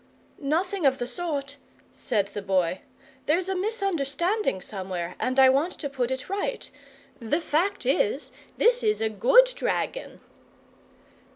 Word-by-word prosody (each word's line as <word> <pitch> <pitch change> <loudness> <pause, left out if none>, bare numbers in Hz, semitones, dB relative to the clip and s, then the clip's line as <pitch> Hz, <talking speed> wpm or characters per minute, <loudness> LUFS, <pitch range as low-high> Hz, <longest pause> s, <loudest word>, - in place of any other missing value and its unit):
"Nothing 345 +6 -1
of 265 0 +2
the 245 - -3
sort," 280 +1 -2 0.3
said 205 -6 -1
the 205 - -5
Boy. 185 -2 0 0.5
"There's 340 +5 +2
a 385 - 0
misunderstanding 370 - -1
somewhere, 185 -3 -4
and 255 +1 0
I 265 -1 +8
want 285 +7 +2
to 285 - -5
put 250 -3 -1
it 260 0 -4
right. 405 +6 -3 0.5
The 240 +7 0
fact 340 +4 0
is, 455 -1 +1 0.3
this 480 +2 +4
is 425 -1 +1
a 220 - 0
GOOD 375 - +5
dragon." - - -3
285 Hz, 135 wpm, -26 LUFS, 235-390 Hz, 0.5 s, I